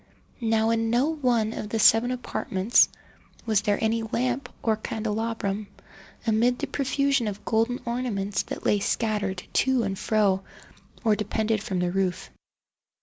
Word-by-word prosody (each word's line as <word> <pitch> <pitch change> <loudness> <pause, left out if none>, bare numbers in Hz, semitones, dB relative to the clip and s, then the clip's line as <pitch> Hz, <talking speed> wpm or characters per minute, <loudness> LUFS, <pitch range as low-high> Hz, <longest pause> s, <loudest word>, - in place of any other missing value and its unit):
Now 225 -1 +2
in 225 0 +1
no 245 +6 +2
one 245 -8 +1
of 210 - -5
the 225 - -1
seven 225 +2 +5
apartments 235 -4 +2 0.6
was 215 -3 +2
there 205 -1 +1
any 225 +1 +1
lamp 245 +4 -2
or 220 -1 +2
candelabrum, 215 -1 -3 0.6
amid 235 +2 +2
the 290 - -2
profusion 275 -2 0
of 205 0 -6
golden 230 +2 +1
ornaments 230 -5 -1
that - - -7
lay 205 - +3
scattered 200 -3 -1
to 260 -3 +2
and 195 -2 -3
fro 205 -3 +2 0.6
or 220 -2 +4
depended 215 +1 -1
from 190 -3 -3
the 180 0 0
roof. 190 -1 -1
220 Hz, 145 wpm, -26 LUFS, 205-240 Hz, 0.6 s, seven